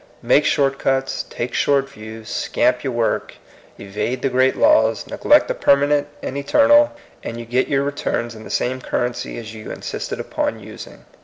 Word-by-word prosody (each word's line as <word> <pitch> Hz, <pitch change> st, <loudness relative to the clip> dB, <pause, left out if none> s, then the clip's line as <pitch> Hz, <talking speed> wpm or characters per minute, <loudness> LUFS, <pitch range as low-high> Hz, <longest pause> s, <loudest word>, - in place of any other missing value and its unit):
Make -, -, +4 dB
short 135 Hz, -1 st, +1 dB
cuts, 135 Hz, 0 st, -1 dB
take 120 Hz, +1 st, -4 dB
short 140 Hz, -1 st, +2 dB
views, 110 Hz, -3 st, -10 dB
scamp 125 Hz, +3 st, 0 dB
your 135 Hz, -, -2 dB
work, 115 Hz, -1 st, -1 dB, 0.4 s
evade 105 Hz, +6 st, -4 dB
the 135 Hz, -, +2 dB
great 130 Hz, +1 st, +2 dB
laws, 110 Hz, -1 st, +3 dB
neglect -, -, +3 dB
the -, -, -1 dB
permanent 145 Hz, +1 st, +3 dB, 0.2 s
and 130 Hz, -, -4 dB
eternal, 290 Hz, -, +4 dB, 0.3 s
and 115 Hz, -, -6 dB
you 120 Hz, -, -7 dB
get 125 Hz, +3 st, 0 dB
your 140 Hz, -1 st, +1 dB
returns 140 Hz, -4 st, -2 dB
in 110 Hz, -1 st, -11 dB
the -, -, -10 dB
same 130 Hz, +1 st, -1 dB
currency 120 Hz, -1 st, -3 dB
as 110 Hz, -1 st, -8 dB
you 110 Hz, -1 st, -9 dB
insisted -, -, -5 dB
upon -, -, -2 dB
using. -, -, -11 dB
130 Hz, 170 wpm, -20 LUFS, 115-140 Hz, 0.4 s, Make